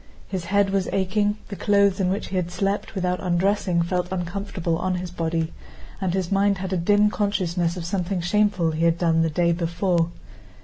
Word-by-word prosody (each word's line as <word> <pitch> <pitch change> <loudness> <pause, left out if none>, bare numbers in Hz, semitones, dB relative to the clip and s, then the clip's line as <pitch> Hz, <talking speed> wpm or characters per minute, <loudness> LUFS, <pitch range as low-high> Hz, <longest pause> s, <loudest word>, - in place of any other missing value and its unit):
His 185 -3 -4
head 200 +2 +2
was 195 -1 0
aching, 205 +2 +1
the 200 - -5
clothes 200 -1 +3
in 185 -2 +2
which 195 +3 -2
he 190 - -4
had 180 -2 0
slept 195 +4 -2
without 180 -1 0
undressing 180 -1 +1
felt 180 +1 -2
uncomfortable 180 -2 -2
on 185 0 0
his 180 -1 -4
body, 165 -1 -2 0.5
and 190 -2 0
his 185 -1 -2
mind 200 0 +3
had 190 +1 -4
a - - +1
dim 205 +4 +3
consciousness 185 -5 0
of 170 - -5
something 185 0 -1
shameful 185 -1 +2
he 160 +1 0
had 165 0 +3
done 165 -1 +2
the 165 - +2
day 170 +2 +2
before. 170 0 0
185 Hz, 190 wpm, -24 LUFS, 170-200 Hz, 0.5 s, clothes